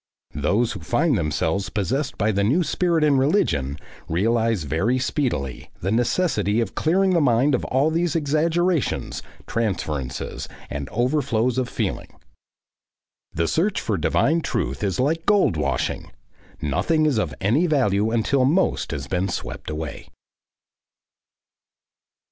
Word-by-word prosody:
Those 100 +11 +1
who 100 - -6
find 145 - +1
themselves 80 +2 -1
possessed 130 - -2
by 110 +1 +2
the 100 -1 0
new 140 - +3
spirit 170 -1 +1
in 145 -3 +4
religion, 75 - +1 0.3
realise 115 +2 +1
very 80 - 0
speedily 125 - -2
the 95 - -2
necessity 115 - +1
of 115 -4 -2
clearing 190 +4 +2
the 170 -2 +3
mind 130 +1 +3
of 125 - +1
all 135 +5 +2
these 170 0 0
exaggerations, 165 +2 0 0.2
transferences, 80 - -3 0.2
and 70 -1 -4
overflows 125 -1 +1
of 125 -1 -2
feeling. - - -3 1.2
The 85 0 -1
search 190 - +1
for 110 - -1
divine 155 - +2
truth 70 - -2
is 100 +1 -1
like 160 +6 0
gold 205 - +4
washing; 70 -4 -2 0.5
nothing 155 - +1
is 140 -7 +2
of 80 -9 -2
any 125 - +2
value 110 - +2
until 115 +4 +1
most 160 +9 +1
has 70 -3 -4
been 90 +7 -1
swept - - -5
away. 75 -1 -5
115 Hz, 130 wpm, -23 LUFS, 90-155 Hz, 1.2 s, in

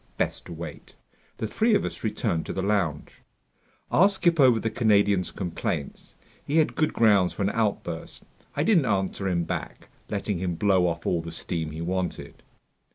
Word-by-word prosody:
Best - - -2
to - - -9
wait. - - -8 0.4
The - - -2
three 220 0 +2
of 205 - +1
us - - -5
returned 85 -6 -1
to - - -3
the 95 - -2
lounge. 95 -7 -1 0.7
I'll 195 +4 +6
skip 175 -4 +1
over 125 -5 +6
the 115 - -2
Canadian's 100 -5 +3
complaints. 85 -6 -4 0.3
He 150 - -1
had 155 - +3
good 155 - +1
grounds 100 -5 +4
for - - -2
an 100 - +1
outburst. 100 -7 -3 0.3
I 145 - +1
didn't 170 -6 +4
answer 95 -1 -1
him 85 -2 +1
back, - - -5 0.2
letting 100 -2 -2
him 90 -1 -2
blow 95 -1 +3
off 85 -1 -3
all 85 - +1
the 85 0 -7
steam 80 -1 -3
he 80 +1 -6
wanted. 90 +1 -3
100 Hz, 175 wpm, -26 LUFS, 85-115 Hz, 0.7 s, I'll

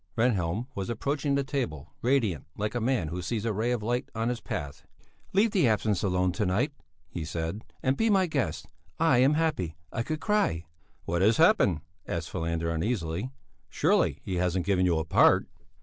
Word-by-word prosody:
Rehnhjelm 110 -3 +1
was 100 -2 -4
approaching 140 +5 -1
the 140 - +1
table, 75 - -4
radiant, 115 - +1
like 105 +1 -2
a 120 - -1
man 115 -9 0
who 90 +3 -4
sees 105 +5 -2
a 115 - 0
ray 110 +4 0
of 120 -3 -1
light 120 +3 -1
on 115 +1 0
his 125 -2 -3
path. 70 -2 -5 0.5
"Leave 205 +3 +3
the 180 -10 +3
absinth 105 -2 +1
alone 90 -2 +1
to 100 - -2
night," 115 +11 +1 0.4
he 85 -2 -5
said, 80 +6 -4 0.2
"and 130 0 +2
be 225 - +2
my 195 -3 +4
guest. 150 -6 -2 0.3
I 160 -6 +4
am 135 +4 +5
happy, 115 - -1 0.2
I - - -1
could 155 +6 -3
cry." 160 - +1 0.4
"What 85 +1 0
has 110 +3 +4
happened?" 160 - +4 0.3
asked 85 0 -3
Falander 85 -1 -1
uneasily. 85 +3 -2 0.4
"Surely, - - +2
he 95 - -3
hasn't 90 0 0
given 95 -2 +2
you 85 -2 +2
a 80 - -1
part?" - - +5
105 Hz, 185 wpm, -28 LUFS, 85-130 Hz, 0.5 s, am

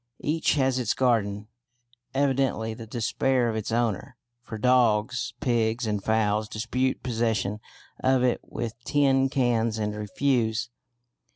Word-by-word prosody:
Each 155 +2 +1
has 130 -2 +2
its 125 - 0
garden, 105 -5 +1 0.7
evidently 135 -5 +1
the 115 0 -9
despair 120 +2 0
of 110 - -2
its 110 0 -3
owner, 115 -4 -1 0.2
for 115 -2 -7
dogs, 120 -1 +2
pigs, 120 -3 +1
and 105 -2 -2
fowls 110 -1 +1
dispute 125 +4 -1
possession 110 -4 -1 0.4
of 130 -1 +3
it 125 -1 +1
with 115 -1 -5
tin 135 -1 +3
cans 120 -5 +1
and 105 -1 -2
refuse. 115 +1 0
120 Hz, 125 wpm, -26 LUFS, 110-130 Hz, 0.7 s, of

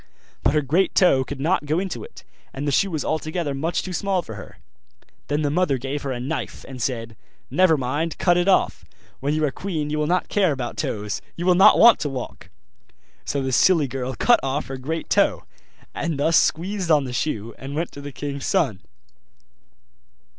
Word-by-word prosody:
But 135 +5 +2
her 150 - +2
great 165 +8 +1
toe 135 -8 +5
could 140 +1 -7
not 150 +1 0
go 155 +2 +1
into 190 -1 -4
it, 465 - -13 0.3
and 140 +2 -3
the - - +1
shoe 195 +9 +2
was 155 -4 -3
altogether 155 -1 -2
much 160 +5 -1
too 185 - -6
small 190 0 0
for 110 - -9
her. 100 - -11 0.7
Then 145 +1 0
the 145 - 0
mother 155 -4 +1
gave 135 +3 -4
her 140 - -3
a 125 - -3
knife, 140 +6 -5
and 130 -2 -8
said, 115 -2 -3 0.4
'Never 180 -4 +4
mind, 145 +6 -2
cut 175 -1 +3
it 175 +1 +1
off; 195 - +2 0.4
when 145 +3 -1
you 155 0 +1
are 140 - -1
queen 155 -3 -4
you 150 - -1
will 150 - 0
not 180 +2 +1
care 195 -5 +2
about 125 -3 -5
toes; 105 -1 -3
you 175 - -4
will 180 - +5
not 190 +2 +7
want 235 -1 +7
to 145 - -2
walk.' 130 -3 -7 0.8
So 140 -1 -2
the 130 - -2
silly 155 +4 +4
girl 130 0 -4
cut 240 - +4
off 135 +2 -2
her 135 0 -6
great 160 +5 -4
toe, - - +2 0.5
and 165 -4 -2
thus 160 +3 +2
squeezed 185 +3 +1
on 150 -3 +4
the 125 -2 -6
shoe, 115 -5 -2
and 135 +2 -7
went 165 +2 -2
to 140 - -10
the 145 0 -7
king's 140 0 -5
son. 145 - +1
150 Hz, 205 wpm, -23 LUFS, 135-175 Hz, 0.8 s, not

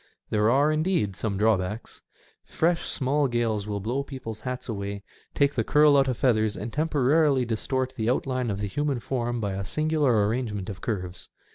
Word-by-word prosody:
There 105 +1 +3
are, 140 +5 +4
indeed, 155 - 0
some 100 -1 -2
drawbacks. 105 0 0 0.4
Fresh, 170 +1 0
small 140 +1 +1
gales 115 -4 -1
will 105 -1 -2
blow 120 +7 -1
people's 130 -6 -7
hats 125 +1 -5
away, 100 -2 -4 0.3
take 140 0 +3
the 115 - 0
curl 150 +3 +5
out 135 -1 +4
of 125 -3 -1
feathers, 110 -5 +2
and 110 +2 -6
temporarily 145 -2 +2
distort 130 +3 -2
the 110 -1 -1
outline 130 -1 0
of 100 -1 -3
the 105 - -1
human 145 +4 -1
form 120 0 -2
by 100 -3 -2
a 100 +1 -3
singular 145 -4 +1
arrangement 105 -4 -2
of 95 - -10
curves. 90 -4 -4
120 Hz, 175 wpm, -26 LUFS, 105-140 Hz, 0.4 s, curl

